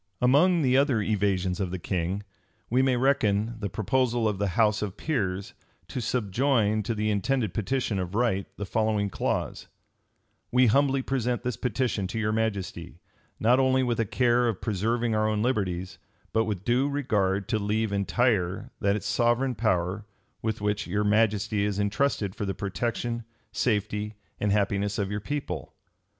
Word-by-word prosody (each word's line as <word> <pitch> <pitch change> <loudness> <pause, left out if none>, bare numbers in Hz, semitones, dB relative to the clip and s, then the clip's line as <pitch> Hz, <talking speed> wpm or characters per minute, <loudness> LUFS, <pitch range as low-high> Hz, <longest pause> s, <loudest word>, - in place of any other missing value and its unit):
Among 155 +7 +4
the 130 -1 +3
other 135 -4 +3
evasions 95 -4 0
of 95 -3 -1
the 95 - -3
king, 90 +2 -2 0.5
we 125 +2 +4
may 130 -2 +2
reckon 115 -4 +1
the 100 -2 -3
proposal 120 +2 +1
of 105 -3 -1
the 100 - +1
house 105 -2 +3
of 105 -1 -4
peers, 100 -11 -2 0.4
to 125 - -3
subjoin 110 -1 +1
to 110 +2 -2
the 105 0 0
intended 105 0 0
petition 110 0 -1
of 90 +1 -4
right 110 -5 +1
the 105 - -4
following 105 -1 0
clause: - - -2 0.8
"We 125 +1 +5
humbly 135 +3 +3
present 125 -2 -1
this 125 -2 -1
petition 115 -4 -1
to 95 - -5
your 105 -1 0
majesty, 100 -6 -3 0.4
not 120 +4 +4
only 130 0 +3
with 120 -2 0
a 115 - +2
care 120 +2 +2
of 110 -5 -1
preserving 115 +3 0
our 110 0 +2
own 105 0 0
liberties, 95 -7 -1 0.3
but 110 0 +2
with 100 -3 -4
due 130 +4 +2
regard 105 -9 0
to 110 - +1
leave 105 +1 0
entire 100 -1 0
that 100 +1 +1
sovereign 120 +2 +1
power 100 -2 0 0.3
with 110 -1 -2
which 105 0 -1
your 105 +4 0
majesty 105 0 +2
is 105 -1 -1
intrusted 105 -1 0
for 105 - -4
the 95 - -2
protection, 115 +4 -2 0.3
safety, 105 -1 -1 0.2
and 105 - +1
happiness 100 0 +1
of 100 -1 -1
your 105 0 -2
people." 105 - -4
110 Hz, 165 wpm, -27 LUFS, 100-120 Hz, 0.8 s, We